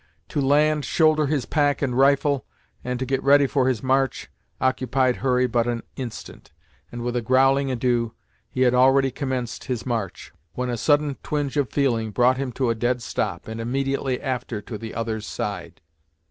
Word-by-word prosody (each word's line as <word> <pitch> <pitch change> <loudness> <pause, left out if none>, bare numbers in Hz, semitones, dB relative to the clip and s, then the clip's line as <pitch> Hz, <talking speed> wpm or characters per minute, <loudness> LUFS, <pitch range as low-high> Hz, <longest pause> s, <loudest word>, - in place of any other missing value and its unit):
To 145 - -1
land, 150 +2 +3
shoulder 155 +1 +3
his 140 -4 0
pack 145 -2 +1
and 125 -3 0
rifle, 140 +1 +3 0.4
and 125 0 -2
to 130 - -3
get 135 +1 -1
ready 140 +1 +5
for 130 -1 +1
his 125 -5 0
march 135 -1 0 0.3
occupied 130 0 +1
Hurry 125 -1 +2
but 120 -1 +1
an 120 -1 -2
instant, 120 - -8 0.4
and 120 0 -6
with 120 0 -2
a 120 - +1
growling 135 +3 +3
adieu, 120 -2 0 0.3
he 130 - -3
had 125 -1 +4
already 135 +1 +4
commenced 130 -3 -4
his 120 -3 -3
march, 115 -7 -4 0.2
when 125 0 -2
a - - -1
sudden 145 +2 +2
twinge 145 -2 -2
of 145 -4 +1
feeling 120 -6 0
brought 125 +4 +3
him 135 -1 -3
to 125 -1 0
a - - +2
dead 120 +2 -1
stop, - - -3
and 110 +1 -5
immediately 135 +1 -1
after 125 -4 -3
to 110 +2 -8
the 110 +1 -7
other's 110 -2 -3
side. 100 -4 -5
130 Hz, 180 wpm, -23 LUFS, 120-135 Hz, 0.4 s, ready